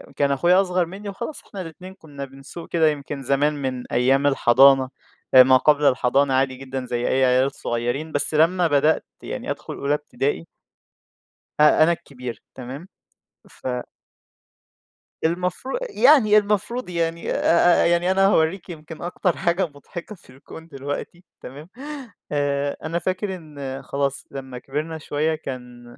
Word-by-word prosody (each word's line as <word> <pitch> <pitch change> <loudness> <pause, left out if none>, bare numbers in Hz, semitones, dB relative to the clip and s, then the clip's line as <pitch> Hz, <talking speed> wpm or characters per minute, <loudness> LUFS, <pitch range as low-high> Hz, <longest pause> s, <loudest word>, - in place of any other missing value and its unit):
كان 140 -1 +1
أخويا 175 +7 +4
أصغر 180 -2 0
منّي 200 +4 -8
وخلاص 235 +9 -6
إحنا 195 - -7
الاتنين 180 +3 -10
كُنّا 145 -6 -9
بنسوق 135 +5 -11
كده 165 -2 +3
يمكن 145 -1 -5
زمان 140 +3 +1
من 130 -3 -4
أيام 135 +3 +3
الحضانة 135 0 +5 0.4
أ 130 -1 +10
ما 130 0 +6
قبل 150 +1 +3
الحضانة 135 +1 +3
عادي 130 0 +1
جدًا 130 0 -6
زي 120 -1 -2
أي 130 0 +3
عيال 130 +2 +3
صغيرين، 120 +6 -3
بس 145 +1 +1
لمّا 170 +3 +3
بدأت 150 +1 +2 0.2
يعني - - -5
أدخل - - -6
أولى 140 +1 -1
ابتدائي 145 - -2 1.1
أ 150 +1 +6
أنا 170 - +4
الكبير 125 -8 -7
تمام؟ 130 +7 -8 0.6
ف - - -9 1.6
المفرو 180 - -1
يعني 240 - +5
المفروض 210 +2 0
يعني 170 -1 -2
أ 170 +1 +4
أ - - +2
يعني 175 +2 +2
أنا 195 +1 +3
هاورّيكِ 175 0 +1
يمكن 160 -1 -9
أكتر 175 +1 -1
حاجة 180 0 +1
مضحكة 170 +7 -10
في - - -22
الكون 140 +5 -13
دلوقتي 145 +4 -6 0.2
تمام؟ 145 +7 -10 0.6
آآ 145 -1 -1
أنا 165 +2 -2
فاكر 185 +3 -2
إن 140 -6 -7
خلاص 140 -1 -2
لمّا 130 -2 -7
كبرنا 155 +5 -4
شوية 155 +1 -1
كان 125 -5 -8
150 Hz, 145 wpm, -22 LUFS, 135-175 Hz, 1.6 s, أ